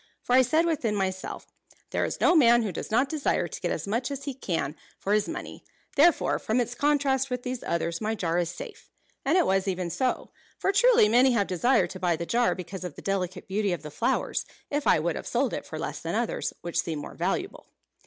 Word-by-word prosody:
For 245 Hz, -, -1 dB
I 260 Hz, -, +8 dB
said 310 Hz, +7 st, +2 dB
within 265 Hz, -10 st, 0 dB
myself, 190 Hz, -1 st, -3 dB, 0.5 s
'There -, -, +1 dB
is -, -, -4 dB
no 350 Hz, -, +4 dB
man 240 Hz, -6 st, +6 dB
who 210 Hz, -, -2 dB
does 160 Hz, -, -6 dB
not 245 Hz, +5 st, +3 dB
desire 300 Hz, 0 st, 0 dB
to -, -, -8 dB
get -, -, -1 dB
as -, -, -3 dB
much 230 Hz, +6 st, -1 dB
as 280 Hz, -1 st, -5 dB
he 280 Hz, -1 st, -3 dB
can 165 Hz, -, -2 dB, 0.2 s
for 200 Hz, -, -1 dB
his 210 Hz, -1 st, +2 dB
money, 340 Hz, +2 st, -7 dB, 0.3 s
therefore, 330 Hz, +4 st, +4 dB
from 220 Hz, +3 st, 0 dB
its 240 Hz, 0 st, -1 dB
contrast 275 Hz, -1 st, +1 dB
with 250 Hz, -1 st, -3 dB
these 250 Hz, -1 st, -4 dB
others, 170 Hz, 0 st, -2 dB
my 220 Hz, +1 st, -1 dB
jar 175 Hz, -4 st, 0 dB
is 170 Hz, -1 st, 0 dB
safe.' 175 Hz, -, -9 dB, 0.3 s
And 305 Hz, +6 st, +3 dB
it 360 Hz, -, +4 dB
was 195 Hz, 0 st, +1 dB
even 180 Hz, -2 st, -2 dB
so; 255 Hz, +7 st, -1 dB, 0.3 s
for 390 Hz, -, +1 dB
truly, 400 Hz, -, +5 dB
many 250 Hz, +4 st, +5 dB
have 205 Hz, -4 st, +2 dB
desired 185 Hz, 0 st, +2 dB
to 185 Hz, -, -7 dB
buy 175 Hz, -2 st, +1 dB
the 170 Hz, -, -4 dB
jar 240 Hz, +6 st, +2 dB
because 185 Hz, +1 st, -7 dB
of 180 Hz, -5 st, -6 dB
the -, -, -11 dB
delicate 185 Hz, -2 st, -2 dB
beauty 200 Hz, 0 st, 0 dB
of 175 Hz, -, -5 dB
the 150 Hz, -, -7 dB
flowers, -, -, 0 dB, 0.3 s
if 290 Hz, 0 st, -1 dB
I -, -, +6 dB
would -, -, -1 dB
have -, -, -6 dB
sold -, -, 0 dB
it -, -, -4 dB
for -, -, -6 dB
less -, -, -4 dB
than -, -, -3 dB
others -, -, -1 dB
which 170 Hz, -1 st, -2 dB
seemed 160 Hz, -3 st, -4 dB
more -, -, -8 dB
valuable." 195 Hz, -, -3 dB
220 Hz, 230 wpm, -27 LUFS, 180-270 Hz, 0.5 s, I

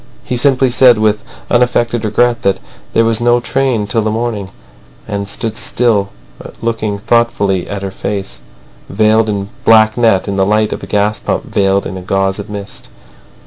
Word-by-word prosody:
He 125 Hz, -, -3 dB
simply 130 Hz, 0 st, +2 dB
said 125 Hz, -1 st, +5 dB
with 105 Hz, -1 st, +1 dB, 0.3 s
unaffected 120 Hz, -1 st, +1 dB
regret 120 Hz, +2 st, +1 dB
that 100 Hz, -1 st, +1 dB, 0.3 s
there 115 Hz, -, +3 dB
was 115 Hz, 0 st, +1 dB
no 120 Hz, 0 st, +3 dB
train 125 Hz, -3 st, 0 dB
till 110 Hz, +2 st, 0 dB
the 110 Hz, -, -1 dB
morning, 110 Hz, -3 st, -3 dB, 0.6 s
and 100 Hz, -1 st, -4 dB
stood 110 Hz, +1 st, -3 dB, 1.1 s
looking 115 Hz, -3 st, -2 dB
thoughtfully 100 Hz, -4 st, 0 dB
at 100 Hz, -1 st, -5 dB
her 95 Hz, -, -4 dB
face, 95 Hz, -12 st, -5 dB, 0.5 s
veiled 110 Hz, +2 st, +2 dB
in 100 Hz, -1 st, -3 dB
black 110 Hz, 0 st, +5 dB
net, 110 Hz, -6 st, +2 dB
in 100 Hz, -1 st, -2 dB
the 95 Hz, -, +3 dB
light 105 Hz, +2 st, +1 dB
of -, -, -6 dB
a -, -, -8 dB
gas 105 Hz, +1 st, 0 dB
lamp -, -, -1 dB
veiled 100 Hz, 0 st, +1 dB
in 95 Hz, -, -5 dB
a -, -, -7 dB
gauze 95 Hz, +1 st, -1 dB
of 100 Hz, +1 st, -7 dB
mist. 100 Hz, -1 st, -8 dB
110 Hz, 170 wpm, -14 LUFS, 100-115 Hz, 1.1 s, said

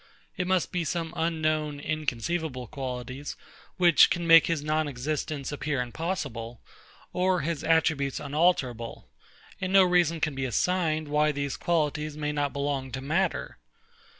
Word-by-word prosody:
It 180 Hz, -, -2 dB
must 185 Hz, -3 st, +1 dB
be 180 Hz, -1 st, -1 dB
some 165 Hz, +1 st, -3 dB
unknown, 155 Hz, -3 st, 0 dB
inconceivable 150 Hz, -1 st, -2 dB
qualities, 130 Hz, 0 st, -6 dB, 0.4 s
which 175 Hz, -3 st, +6 dB
can 175 Hz, -1 st, -1 dB
make 165 Hz, -1 st, +7 dB
his 165 Hz, -3 st, -1 dB
non 155 Hz, 0 st, 0 dB
existence 145 Hz, +1 st, -3 dB
appear 145 Hz, -1 st, -2 dB
impossible, 125 Hz, -4 st, -4 dB, 0.5 s
or 180 Hz, -1 st, +2 dB
his 160 Hz, 0 st, -3 dB
attributes 155 Hz, -4 st, +2 dB
unalterable: 140 Hz, -6 st, 0 dB, 0.5 s
And 185 Hz, -, -2 dB
no 195 Hz, 0 st, +7 dB
reason 175 Hz, -2 st, +3 dB
can 155 Hz, -1 st, 0 dB
be 135 Hz, 0 st, -3 dB
assigned, 155 Hz, +3 st, 0 dB
why 150 Hz, +1 st, +2 dB
these 140 Hz, -1 st, -3 dB
qualities 150 Hz, -2 st, -1 dB
may 150 Hz, -1 st, -2 dB
not 145 Hz, -1 st, -1 dB
belong 140 Hz, -1 st, -2 dB
to 130 Hz, -, -4 dB
matter. 160 Hz, +8 st, -1 dB
150 Hz, 140 wpm, -27 LUFS, 140-165 Hz, 0.5 s, make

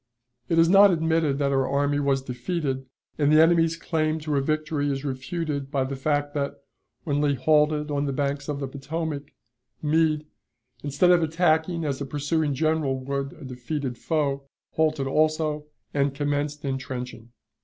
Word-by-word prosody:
It 165 Hz, -, +2 dB
is 165 Hz, 0 st, +6 dB
not 200 Hz, +3 st, +7 dB
admitted 160 Hz, -4 st, +1 dB
that 140 Hz, -1 st, +1 dB
our 135 Hz, -1 st, +2 dB
army 145 Hz, +1 st, +1 dB
was 135 Hz, -2 st, +1 dB
defeated, 135 Hz, +1 st, -3 dB, 0.3 s
and 145 Hz, 0 st, +3 dB
the 155 Hz, -, +6 dB
enemy's 165 Hz, 0 st, +4 dB
claim 155 Hz, -2 st, 0 dB
to 150 Hz, -1 st, -2 dB
a 140 Hz, -, +2 dB
victory 155 Hz, 0 st, -1 dB
is 135 Hz, +1 st, -4 dB
refuted 140 Hz, +1 st, -3 dB
by 135 Hz, -2 st, 0 dB
the 135 Hz, +1 st, -4 dB
fact 145 Hz, +1 st, -1 dB
that, 140 Hz, -1 st, -2 dB, 0.5 s
when 145 Hz, -2 st, 0 dB
Lee 145 Hz, -1 st, +2 dB
halted 150 Hz, +2 st, +2 dB
on 145 Hz, 0 st, 0 dB
the -, -, -1 dB
banks 140 Hz, +1 st, -2 dB
of 145 Hz, -1 st, -2 dB
the 135 Hz, -, -3 dB
Potomac, 145 Hz, +2 st, -4 dB, 0.5 s
Meade, 155 Hz, 0 st, +1 dB, 0.6 s
instead 145 Hz, +5 st, +3 dB
of 175 Hz, -1 st, +5 dB
attacking 160 Hz, +1 st, +1 dB
as 140 Hz, -2 st, -2 dB
a 140 Hz, -, -3 dB
pursuing 145 Hz, +1 st, -1 dB
general 155 Hz, -2 st, +1 dB
would 140 Hz, 0 st, -3 dB
a 155 Hz, -, -12 dB
defeated 130 Hz, +1 st, -4 dB
foe, 140 Hz, -1 st, -1 dB, 0.2 s
halted 155 Hz, -3 st, +1 dB
also, 155 Hz, +1 st, +1 dB, 0.3 s
and 140 Hz, -1 st, +1 dB
commenced 145 Hz, +1 st, -2 dB
intrenching. 125 Hz, -3 st, -5 dB
145 Hz, 165 wpm, -25 LUFS, 140-155 Hz, 0.6 s, not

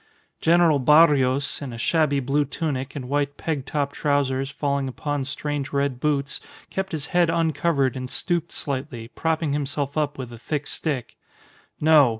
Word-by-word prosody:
General 165 Hz, -3 st, +4 dB
Barrios, 140 Hz, -1 st, +4 dB
in 140 Hz, -3 st, -5 dB
a 115 Hz, -, -7 dB
shabby 145 Hz, +3 st, +2 dB
blue 140 Hz, +3 st, +1 dB
tunic 140 Hz, -2 st, -3 dB
and 130 Hz, -3 st, -5 dB
white 145 Hz, +1 st, -1 dB
peg 145 Hz, -5 st, -3 dB
top 145 Hz, -1 st, -1 dB
trousers 135 Hz, -2 st, 0 dB
falling 140 Hz, -1 st, -1 dB
upon 145 Hz, +1 st, -3 dB
strange 145 Hz, 0 st, -3 dB
red 140 Hz, -3 st, 0 dB
boots, 140 Hz, 0 st, 0 dB, 0.3 s
kept 190 Hz, 0 st, -3 dB
his 150 Hz, -3 st, -2 dB
head 175 Hz, -2 st, +4 dB
uncovered 155 Hz, -4 st, +1 dB
and 130 Hz, -1 st, -5 dB
stooped 170 Hz, +1 st, -1 dB
slightly, 130 Hz, -4 st, -4 dB
propping 160 Hz, -1 st, -1 dB
himself 145 Hz, -1 st, -2 dB
up 145 Hz, -1 st, -1 dB
with 125 Hz, -3 st, -6 dB
a 115 Hz, -, -10 dB
thick 150 Hz, +4 st, -3 dB
stick. 140 Hz, -7 st, -3 dB, 0.6 s
No! 150 Hz, -4 st, +6 dB
145 Hz, 155 wpm, -24 LUFS, 135-155 Hz, 0.6 s, No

